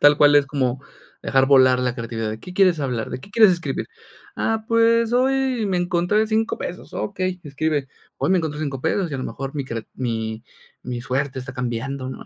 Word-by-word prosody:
tal 145 0 +7
cual, 145 0 +7
es 145 -1 +4
como 130 -3 -1 0.4
dejar 135 0 +3
volar 130 -2 +5
la 125 -1 0
creatividad, 115 -2 -4
¿de 110 +1 -6
qué 180 - -10
quieres 185 -4 +4
hablar? 125 -5 -2
¿De 125 - -5
qué 195 - -14
quieres 215 -1 +6
escribir? 175 -1 -3 0.5
Ah, 225 -1 -1
pues, 230 0 +3
hoy 260 -2 +2
me 190 -2 0
encontré 180 +4 +1
5 220 +1 0
pesos, 180 - -7
okey, 185 -2 -2
escribe, 145 -1 -2 0.3
hoy - - 0
me 190 - +4
encontré 155 -3 -3
5 140 -4 -3
pesos 185 +4 0
y - - -4
a - - -3
lo 130 - -4
mejor 135 +1 -5
mi 140 -2 -2
creat 115 -3 -5
mi 110 -2 -3 0.4
mi 125 -1 -4
suerte 130 +1 -2
está 130 +1 -8
cambiando, 130 +1 -3
¿no? 130 - -8
145 Hz, 205 wpm, -22 LUFS, 130-190 Hz, 0.5 s, tal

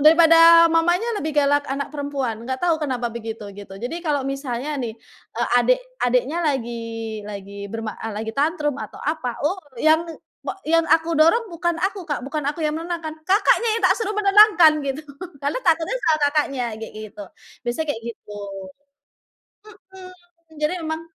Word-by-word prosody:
daripada 330 +1 +8
mamanya 345 +7 +2
lebih 310 0 -3
galak 285 0 +3
anak 280 +1 -2
perempuan, 275 -6 -3
enggak 260 +1 -3
tahu 335 -2 +3
kenapa 250 -4 -1
begitu, 225 -2 -6
gitu. 200 -1 -10
Jadi 250 +10 -5
kalau 290 -3 0
misalnya 275 +1 -3
nih, 225 -3 -4 0.4
eee, - - 0
adik, - - +3 0.2
adiknya 250 +6 +1
lagi, 230 -5 -3
lagi 200 0 -7
berma 225 -2 -5
eee, 225 -1 -4
lagi 220 +1 -4
tantrum 295 -1 0
atau - - -8
apa, 290 -6 -2
oh 375 +5 -1 0.2
yang 315 +1 +4 0.4
pa - - -4
yang 330 +1 +4
aku 330 +1 +3
dorong 335 +10 +4
bukan 345 0 -1
aku, 385 0 -1
Kak, 290 - -1
bukan 300 +1 -3
aku 310 +3 -8
yang 300 - -1
menenangkan. 330 -1 -4
Kakaknya 415 +4 +3
yang - - -9
tak - - +4
suruh 445 -2 -2
menenangkan 395 -7 +6
gitu. 275 +3 -3 0.4
Lalu 285 - -1
takutnya 330 +6 +2
selalu 315 -1 +3
Kakaknya 285 -3 0 0.2
kayak - - -8
gitu. 210 -1 -8 0.4
Biasanya 240 +7 -2
kayak 225 - -9
gitu. 205 0 -11 1.6
Mhm. 370 -1 -10 0.5
Jadi 305 +4 +1
memang 315 0 -3
295 Hz, 160 wpm, -22 LUFS, 240-330 Hz, 1.6 s, daripada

